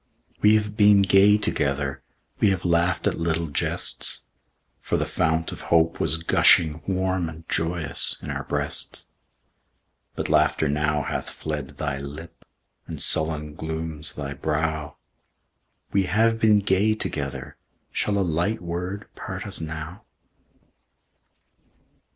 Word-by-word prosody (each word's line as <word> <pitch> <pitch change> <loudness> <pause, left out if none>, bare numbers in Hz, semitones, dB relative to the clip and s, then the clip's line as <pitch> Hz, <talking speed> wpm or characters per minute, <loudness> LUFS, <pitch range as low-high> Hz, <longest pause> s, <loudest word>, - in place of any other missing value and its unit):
We 105 +1 +6
have 105 -1 -1
been 105 -2 +6
gay 100 +2 +5
together; 70 -8 -1 0.4
We 105 - +4
have 95 -2 -1
laughed 85 +2 +1
at - - 0
little 85 0 0
jests; 70 - +1 0.6
For - - -1
the - - -1
fount 80 0 0
of - - -8
hope 85 0 +3
was 80 - 0
gushing 80 -1 +4
Warm 95 -2 0
and 80 0 -12
joyous 80 -2 +2
in - - -6
our - - -4
breasts, - - -2 1.0
But - - -3
laughter 80 - +2
now 75 0 0
hath - - -4
fled 75 -2 -5
thy 70 -3 -3
lip, 75 +4 -9 0.4
And - - -7
sullen 75 -1 +1
glooms 80 0 -4
thy 70 -1 -5
brow; 80 0 -2 1.0
We 100 -1 +2
have 115 +4 +2
been 110 -2 +4
gay 100 +3 +2
together, 70 - -5 0.3
Shall 100 -1 0
a 100 - +1
light 85 +7 0
word 90 +4 -4
part - - -6
us - - -2
now? 80 +3 -7
80 Hz, 130 wpm, -24 LUFS, 75-95 Hz, 1.0 s, We